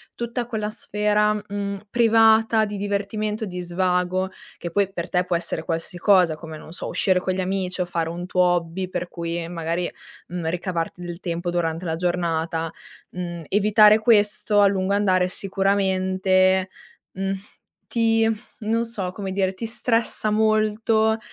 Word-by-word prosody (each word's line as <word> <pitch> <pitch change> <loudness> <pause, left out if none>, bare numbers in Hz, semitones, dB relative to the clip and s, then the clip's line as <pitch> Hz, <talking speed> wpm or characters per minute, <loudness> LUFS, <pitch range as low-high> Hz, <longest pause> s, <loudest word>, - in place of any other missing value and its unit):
tutta 235 +1 -3
quella 220 -3 -3
sfera, 210 0 +1
mhmm, 200 -1 -4
privata, 225 -1 +4
di 205 - -5
divertimento, 205 +2 -2
di 180 -2 -6
svago, 180 +1 0 0.3
che 170 - -6
poi 200 +1 +1
per 175 -3 -5
te 180 -1 +1
può 180 -1 0
essere 170 -1 -2
qualsiasi 165 +1 -4
cosa, 180 -4 +4
come 160 0 -9
non - - -13
lo - - -11
so, - - -5
uscire 185 -2 +2
con 185 0 -2
gli 190 - -1
amici 185 0 -2
o - - +1
fare 170 -2 -2
un 175 +1 -5
tuo 180 0 +1
hobby 175 +1 +1
per 180 -1 -4
cui 170 0 -4
magari, 170 +1 -2 0.4
mhmm, 170 -2 -3
ricavarti 175 0 -3
del 175 -1 -6
tempo 175 -1 -3
durante 165 0 -1
la 160 -2 -2
giornata. 165 -2 -1 0.4
Mhmm, 175 -1 -5
evitare 210 +1 +5
questo, 210 -1 +4
a 200 - +7
lungo 195 0 0
andare 185 -3 +2
sicuramente, 190 -1 +1 0.4
mhmm, 195 +1 -2 0.5
ti 225 -1 +2 0.3
non 225 +2 0
so 195 -6 -3
come 190 0 -5
dire, 190 -1 0
ti 225 +4 -5
stressa 230 -2 +1
molto 220 +1 +2
190 Hz, 160 wpm, -23 LUFS, 175-210 Hz, 0.5 s, a